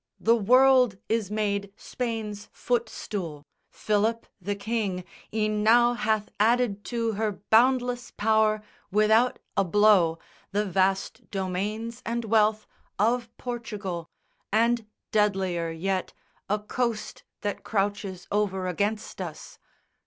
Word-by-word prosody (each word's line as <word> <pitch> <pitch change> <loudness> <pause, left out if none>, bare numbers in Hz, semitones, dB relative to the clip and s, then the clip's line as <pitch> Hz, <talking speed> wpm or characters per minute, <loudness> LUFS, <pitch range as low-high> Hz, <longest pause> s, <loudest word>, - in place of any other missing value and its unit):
The 230 +1 +4
world 250 0 +5
is 220 -3 0
made 200 -2 -1
Spain's 220 -4 -4
footstool. 190 - -3 0.2
Philip, 215 +2 0 0.2
the 205 +3 -2
King, 200 -3 -2 0.3
E'en 215 -1 0
now 240 +3 +5
hath 215 -2 0
added 220 -2 +2
to 230 -2 -1
her 215 0 -1 0.2
boundless 245 +1 +3
power 215 0 +2 0.3
Without 220 +4 +3 0.2
a 195 - +3
blow, 190 -3 +4 0.4
the 210 +1 +1
vast 190 0 0
domains 210 +5 -3
and 235 0 -2
wealth 215 0 +3 0.3
Of 230 +3 +1
Portugal, 210 -8 -5 0.4
and 230 +1 +2 0.2
deadlier 190 -5 +1
yet, 185 +3 -2 0.4
a 210 - +2
coast 225 +1 -3 0.2
That 205 -1 -3
crouches 200 -3 -2
over 195 -2 0
against 205 +4 -2
us. - - -8
215 Hz, 110 wpm, -27 LUFS, 195-230 Hz, 0.4 s, world